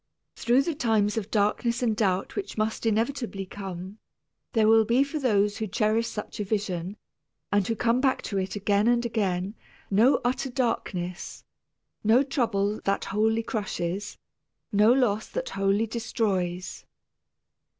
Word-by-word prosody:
Through 245 Hz, +3 st, +3 dB
the 335 Hz, -, -1 dB
times 220 Hz, -7 st, +1 dB
of 220 Hz, -2 st, -3 dB
darkness 225 Hz, +3 st, +1 dB
and 225 Hz, -3 st, +1 dB
doubt 195 Hz, -4 st, 0 dB
which 395 Hz, -, -5 dB
must 220 Hz, +1 st, -1 dB
inevitably 225 Hz, -2 st, -1 dB
come, 190 Hz, +1 st, -7 dB, 0.5 s
there 220 Hz, -3 st, +4 dB
will 225 Hz, 0 st, +6 dB
be 235 Hz, +5 st, +3 dB
for 280 Hz, +2 st, -4 dB
those 205 Hz, -6 st, +2 dB
who 220 Hz, -, -2 dB
cherish 215 Hz, +4 st, +1 dB
such 210 Hz, -, -6 dB
a -, -, 0 dB
vision, 195 Hz, -2 st, -3 dB, 0.5 s
and 205 Hz, -2 st, +2 dB
who 225 Hz, -, 0 dB
come 235 Hz, +2 st, +1 dB
back 265 Hz, -1 st, +1 dB
to 200 Hz, -, -2 dB
it 190 Hz, +1 st, -3 dB
again 205 Hz, +1 st, +1 dB
and 240 Hz, 0 st, +3 dB
again, 195 Hz, -4 st, -1 dB, 0.4 s
no 225 Hz, +8 st, +5 dB
utter 255 Hz, +2 st, 0 dB
darkness, 190 Hz, -8 st, -3 dB, 0.6 s
no 225 Hz, +5 st, +5 dB
trouble 220 Hz, -7 st, 0 dB
that 195 Hz, -, 0 dB
wholly 220 Hz, +3 st, +1 dB
crushes, 200 Hz, -3 st, -3 dB, 0.5 s
no 210 Hz, +2 st, +5 dB
loss 235 Hz, -5 st, +2 dB
that -, -, -4 dB
wholly 195 Hz, +3 st, +1 dB
destroys. 200 Hz, -6 st, -2 dB
215 Hz, 145 wpm, -26 LUFS, 200-235 Hz, 0.6 s, will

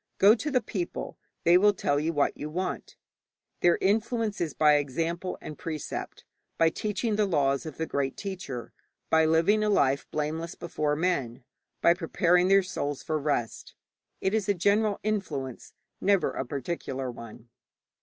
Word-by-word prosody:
'Go 200 Hz, +2 st, +7 dB
to 265 Hz, +6 st, -2 dB
the 255 Hz, -4 st, +1 dB
people; 180 Hz, -5 st, -5 dB, 0.2 s
they 175 Hz, +1 st, +6 dB
will 205 Hz, +1 st, +4 dB
tell 145 Hz, -5 st, +1 dB
you 160 Hz, +3 st, 0 dB
what 145 Hz, -3 st, +1 dB
you 150 Hz, -, -6 dB
want.' 180 Hz, +4 st, -4 dB, 0.6 s
Their 175 Hz, -, +4 dB
influence 220 Hz, +1 st, 0 dB
is 160 Hz, -4 st, -2 dB
by 150 Hz, -1 st, +5 dB
example 165 Hz, +6 st, -2 dB
and 155 Hz, -, -8 dB
precept, 155 Hz, -3 st, -5 dB, 0.3 s
by 165 Hz, 0 st, +4 dB
teaching 210 Hz, +2 st, -2 dB
the 210 Hz, -1 st, +2 dB
laws 140 Hz, -4 st, +1 dB
of 155 Hz, -, -8 dB
the 160 Hz, -, -1 dB
great 140 Hz, -3 st, -2 dB
teacher, 180 Hz, -, -6 dB, 0.4 s
by 160 Hz, 0 st, +5 dB
living 165 Hz, +7 st, +3 dB
a 210 Hz, -, +1 dB
life 140 Hz, -8 st, +2 dB
blameless 160 Hz, +3 st, -3 dB
before 155 Hz, -3 st, -2 dB
men, 140 Hz, -8 st, -1 dB, 0.4 s
by 170 Hz, -, +6 dB
preparing 175 Hz, +1 st, +2 dB
their 195 Hz, 0 st, +5 dB
souls 145 Hz, -6 st, -4 dB
for 155 Hz, -1 st, -1 dB
rest. 140 Hz, -6 st, -2 dB, 0.5 s
It 190 Hz, -, 0 dB
is 215 Hz, -2 st, 0 dB
a 200 Hz, -, +3 dB
general 205 Hz, +3 st, +2 dB
influence, 190 Hz, -, -3 dB, 0.3 s
never 200 Hz, -2 st, +3 dB
a 135 Hz, -, -4 dB
particular 135 Hz, -2 st, -4 dB
one. 115 Hz, 0 st, -11 dB
165 Hz, 160 wpm, -28 LUFS, 145-195 Hz, 0.6 s, Go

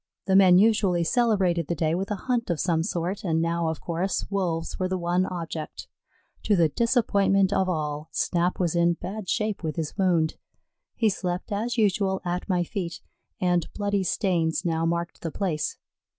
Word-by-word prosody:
The 190 Hz, -, +2 dB
men 185 Hz, -2 st, +7 dB
usually 200 Hz, -4 st, +3 dB
celebrated 185 Hz, -, +2 dB
the 170 Hz, -, -1 dB
day 160 Hz, 0 st, 0 dB
with 190 Hz, +3 st, -2 dB
a 210 Hz, -, -1 dB
hunt 245 Hz, -4 st, 0 dB
of 170 Hz, -3 st, 0 dB
some 170 Hz, -3 st, +1 dB
sort, 175 Hz, +3 st, -2 dB
and 160 Hz, -4 st, +1 dB
now, 170 Hz, 0 st, 0 dB
of 160 Hz, -1 st, -2 dB
course, 175 Hz, +3 st, -2 dB
Wolves 175 Hz, -5 st, -2 dB
were 185 Hz, -, +1 dB
the 185 Hz, 0 st, -1 dB
one 175 Hz, +1 st, +1 dB
object. 165 Hz, -3 st, -6 dB, 0.6 s
To 210 Hz, -, +3 dB
the 165 Hz, -4 st, +4 dB
disappointment 200 Hz, -, +2 dB
of 190 Hz, -1 st, +1 dB
all, 155 Hz, -2 st, -3 dB
Snap 175 Hz, +3 st, 0 dB
was 175 Hz, -2 st, 0 dB
in 170 Hz, 0 st, +3 dB
bad 190 Hz, +2 st, -6 dB
shape 215 Hz, -1 st, -1 dB
with 155 Hz, -3 st, -3 dB
his 160 Hz, -3 st, -4 dB
wound. 170 Hz, -4 st, +2 dB, 0.6 s
He 225 Hz, -2 st, +2 dB
slept, 180 Hz, -1 st, -3 dB
as 230 Hz, +4 st, -2 dB
usual, 195 Hz, -3 st, +2 dB
at 180 Hz, +3 st, -3 dB
my 180 Hz, -2 st, +2 dB
feet, 175 Hz, -2 st, -4 dB, 0.4 s
and 175 Hz, -2 st, +1 dB
bloody 205 Hz, -1 st, 0 dB
stains 180 Hz, -3 st, 0 dB
now 165 Hz, -1 st, +1 dB
marked 170 Hz, +1 st, -2 dB
the 165 Hz, -, -3 dB
place. 160 Hz, -3 st, -2 dB
180 Hz, 180 wpm, -26 LUFS, 170-195 Hz, 0.6 s, men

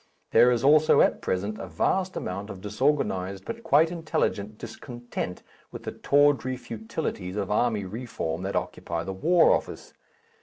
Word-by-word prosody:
There 125 Hz, -, +6 dB
is 120 Hz, -1 st, +1 dB
also 155 Hz, +2 st, +5 dB
at -, -, +2 dB
present 100 Hz, +3 st, -2 dB
a -, -, -6 dB
vast 185 Hz, -1 st, 0 dB
amount 100 Hz, +3 st, -4 dB
of 95 Hz, -, -7 dB
disorganized 105 Hz, -4 st, -1 dB
but 230 Hz, 0 st, -6 dB
quite 160 Hz, -4 st, +4 dB
intelligent 110 Hz, -, -2 dB
discontent 120 Hz, -5 st, -6 dB, 0.3 s
with -, -, -9 dB
the -, -, -4 dB
tawdry 140 Hz, -3 st, +2 dB
futilities 110 Hz, -5 st, -5 dB
of 100 Hz, -2 st, -2 dB
army 105 Hz, -2 st, +1 dB
reform 95 Hz, -6 st, -4 dB
that 95 Hz, +1 st, -3 dB
occupy 85 Hz, 0 st, -3 dB
the 95 Hz, -, -5 dB
War 165 Hz, -, +4 dB
Office. -, -, -2 dB
115 Hz, 150 wpm, -26 LUFS, 95-145 Hz, 0.3 s, There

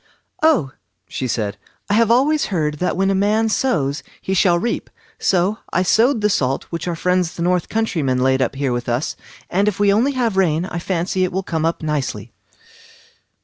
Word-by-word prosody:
"Oh", 300 Hz, -, +3 dB, 0.4 s
she 130 Hz, -, -4 dB
said, 105 Hz, -4 st, -2 dB, 0.3 s
"I 205 Hz, -, 0 dB
have 225 Hz, +1 st, +3 dB
always 285 Hz, +6 st, +3 dB
heard 150 Hz, -6 st, -1 dB
that 180 Hz, -, -1 dB
what 195 Hz, +1 st, +2 dB
a -, -, +2 dB
man 210 Hz, +3 st, +2 dB
sows 155 Hz, -, 0 dB, 0.2 s
he 190 Hz, -, -3 dB
shall 180 Hz, -2 st, +4 dB
reap, 235 Hz, +7 st, -2 dB, 0.3 s
so 190 Hz, +4 st, +1 dB
I 180 Hz, -, +2 dB
sowed 225 Hz, +5 st, +3 dB
the 210 Hz, -, +3 dB
salt 135 Hz, -5 st, 0 dB
which 170 Hz, 0 st, -4 dB
our 175 Hz, -, -1 dB
friends 180 Hz, 0 st, 0 dB
the 170 Hz, -, -3 dB
north 180 Hz, -1 st, +1 dB
country 220 Hz, -6 st, -1 dB
men 130 Hz, -2 st, +1 dB
laid 130 Hz, +1 st, +2 dB
up 135 Hz, -, 0 dB
here 135 Hz, -2 st, -1 dB
with 120 Hz, 0 st, -3 dB
us, 120 Hz, +5 st, -1 dB, 0.3 s
and 195 Hz, +3 st, +1 dB
if 205 Hz, -2 st, -1 dB
we 200 Hz, -1 st, +4 dB
only 250 Hz, +7 st, +2 dB
have 235 Hz, -6 st, 0 dB
rain 170 Hz, -3 st, +2 dB
I 175 Hz, -, -4 dB
fancy 185 Hz, +1 st, -1 dB
it 185 Hz, -, 0 dB
will 190 Hz, +1 st, -2 dB
come 160 Hz, -3 st, -2 dB
up 165 Hz, 0 st, -1 dB
nicely." 130 Hz, -8 st, -3 dB
180 Hz, 200 wpm, -20 LUFS, 150-210 Hz, 0.4 s, shall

